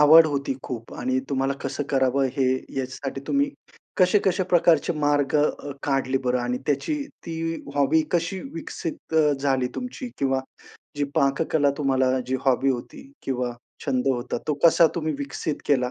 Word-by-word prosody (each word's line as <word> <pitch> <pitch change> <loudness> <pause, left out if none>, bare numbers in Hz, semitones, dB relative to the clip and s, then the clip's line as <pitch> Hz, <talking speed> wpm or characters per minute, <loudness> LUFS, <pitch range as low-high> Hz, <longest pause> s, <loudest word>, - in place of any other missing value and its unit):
आवड 160 +2 +9
होती 140 -2 -1
खूप 115 -2 -6
आणि 130 +1 0
तुम्हाला 135 0 +1
कसं 135 +2 -2
करावं 135 0 +2
हे 135 - +2
ह्याच्यासाठी 130 +1 -5
तुम्ही 280 0 +2 0.5
कशा-कशा 185 0 +3
प्रकारचे 170 -2 +4
मार्ग 145 -1 +2
अ, 145 -1 0
काढले 135 -1 +1
बरं? 125 0 +2
आणि 125 +1 -1
त्याची 145 - 0 0.3
ती 165 0 -2 0.2
हॉबी 145 +3 +3
कशी 175 +3 0
विकसित 165 0 -6
अ, 155 -2 +5
झाली 135 -2 +1
तुमची? 250 0 -5
किंवा 135 -1 +1 0.6
जी 145 - +1
पाककला 140 +1 +2
तुम्हाला 130 -2 +2
जी 130 +1 0
हॉबी 135 +1 +3
होती 135 - -6
किंवा 125 -2 -2 0.3
छंद 130 -1 0
होता, 125 -1 -1
तो 150 - +2
कसा 170 0 +7
तुम्ही 155 -2 -1
विकसित 140 +2 -3
केला 125 -3 +2
140 Hz, 150 wpm, -24 LUFS, 130-160 Hz, 0.6 s, आवड